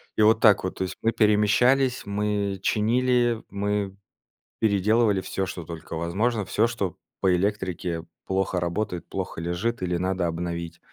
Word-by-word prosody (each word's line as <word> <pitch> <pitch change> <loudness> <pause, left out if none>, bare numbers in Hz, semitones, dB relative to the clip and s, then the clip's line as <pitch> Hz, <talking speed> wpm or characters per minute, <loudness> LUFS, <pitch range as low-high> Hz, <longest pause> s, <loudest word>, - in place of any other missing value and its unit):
И - - +1
вот 110 +1 +5
так 105 -4 +5
вот, 95 - -3
то - - -1
есть 95 - -4
мы 115 - +2
перемещались, 120 +5 +3
мы 100 -1 -1
чинили, 120 +1 +2
мы 100 -1 -2 0.6
переделывали 105 0 +3
всё, 95 0 -3
что 90 - -6
только 80 0 -8
возможно, 105 +7 0
всё, 105 +4 +2
что 100 -7 -3 0.2
по 95 - +3
электрике 90 -3 -1 0.2
плохо 95 -1 0
работает, 90 +1 -2
плохо - - -4
лежит 90 +7 -2
или 90 -1 0
надо 95 0 0
обновить. 85 0 -4
100 Hz, 150 wpm, -25 LUFS, 90-110 Hz, 0.6 s, вот